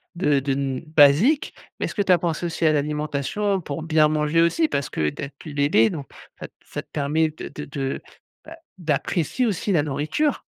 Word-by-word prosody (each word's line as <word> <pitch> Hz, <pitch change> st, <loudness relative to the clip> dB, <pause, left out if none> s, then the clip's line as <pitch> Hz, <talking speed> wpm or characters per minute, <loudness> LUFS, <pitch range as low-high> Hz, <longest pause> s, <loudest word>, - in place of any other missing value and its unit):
de 150 Hz, -5 st, +2 dB
de 135 Hz, +1 st, -2 dB
n 135 Hz, -1 st, -2 dB
basique, 155 Hz, -, +4 dB, 0.3 s
mais -, -, 0 dB
est-ce -, -, -6 dB
que 205 Hz, -, +1 dB
tu 195 Hz, -2 st, +2 dB
as 180 Hz, -, +7 dB
pensé 170 Hz, 0 st, -2 dB
aussi 165 Hz, 0 st, -2 dB
à 155 Hz, -, +5 dB
l'alimentation 150 Hz, +6 st, -1 dB
pour 155 Hz, +1 st, -5 dB
bien 155 Hz, -1 st, +4 dB
manger 155 Hz, +1 st, +2 dB
aussi? 240 Hz, -, +3 dB
Parce 140 Hz, -, -2 dB
que 75 Hz, -1 st, 0 dB
d'être 140 Hz, -, -8 dB
plus 155 Hz, -, -9 dB
d 140 Hz, 0 st, +1 dB
aidée 115 Hz, -6 st, +4 dB
donc 145 Hz, -7 st, -6 dB, 0.3 s
ça -, -, -6 dB
t -, -, -34 dB
ça -, -, -5 dB
te -, -, -30 dB
permet 155 Hz, +3 st, +1 dB
de 155 Hz, -, -8 dB
de 150 Hz, -, -7 dB
de, 140 Hz, -2 st, -4 dB, 0.4 s
bah, 325 Hz, +1 st, -11 dB, 0.2 s
d'apprécier 170 Hz, -, -1 dB
aussi 205 Hz, -2 st, -1 dB
la 160 Hz, -6 st, +3 dB
nourriture. 155 Hz, -, -1 dB
155 Hz, 210 wpm, -23 LUFS, 140-170 Hz, 0.4 s, as